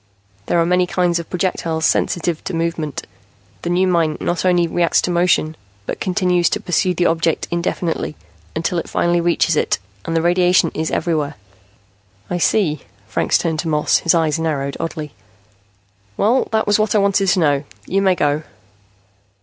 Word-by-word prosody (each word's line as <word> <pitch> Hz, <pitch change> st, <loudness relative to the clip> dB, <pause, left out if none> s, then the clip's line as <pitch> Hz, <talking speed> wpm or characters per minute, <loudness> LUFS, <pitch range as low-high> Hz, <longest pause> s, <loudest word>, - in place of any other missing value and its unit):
There 170 Hz, -, +2 dB
are 165 Hz, -, +3 dB
many 180 Hz, +1 st, +2 dB
kinds 175 Hz, -1 st, +1 dB
of 170 Hz, -, -8 dB
projectiles 170 Hz, -3 st, -1 dB
sensitive 170 Hz, -2 st, 0 dB
to 190 Hz, -, -3 dB
movement. 165 Hz, -3 st, -3 dB, 0.6 s
The -, -, -3 dB
new 180 Hz, +2 st, +2 dB
mine 165 Hz, -4 st, +1 dB
not 175 Hz, +1 st, -2 dB
only 175 Hz, -2 st, +3 dB
reacts 170 Hz, 0 st, +2 dB
to 180 Hz, -, 0 dB
motion, 170 Hz, -2 st, +2 dB, 0.3 s
but -, -, -4 dB
continues 180 Hz, -2 st, +1 dB
to -, -, -1 dB
pursue 180 Hz, 0 st, 0 dB
the 175 Hz, -, +1 dB
object 165 Hz, -1 st, +1 dB
indefinitely, 170 Hz, -2 st, -2 dB, 0.4 s
until 170 Hz, +2 st, -1 dB
it -, -, -7 dB
finally 175 Hz, 0 st, +1 dB
reaches 170 Hz, -1 st, +2 dB
it. -, -, +1 dB, 0.3 s
And 165 Hz, -, -3 dB
the 165 Hz, -, +1 dB
radiation 175 Hz, -1 st, +3 dB
is 160 Hz, 0 st, -2 dB
everywhere." 155 Hz, -3 st, -1 dB, 1.0 s
"I 175 Hz, -, -1 dB
see." 165 Hz, -6 st, +1 dB, 0.3 s
Franks -, -, +1 dB
turned 160 Hz, -2 st, -2 dB
to 165 Hz, -, -2 dB
Moss, 150 Hz, -1 st, +2 dB
his 165 Hz, -, +2 dB
eyes 160 Hz, -1 st, +1 dB
narrowed 140 Hz, -4 st, -2 dB
oddly. 155 Hz, -2 st, -4 dB, 1.1 s
"Well, 235 Hz, +6 st, +2 dB
that 220 Hz, 0 st, +1 dB
was 205 Hz, +1 st, +2 dB
what 215 Hz, 0 st, +1 dB
I -, -, +5 dB
wanted 200 Hz, -1 st, +2 dB
to 185 Hz, -, +3 dB
know. 145 Hz, -3 st, +2 dB, 0.2 s
You 195 Hz, +1 st, 0 dB
may 190 Hz, -2 st, +3 dB
go." 145 Hz, -2 st, +1 dB
170 Hz, 170 wpm, -19 LUFS, 160-180 Hz, 1.1 s, I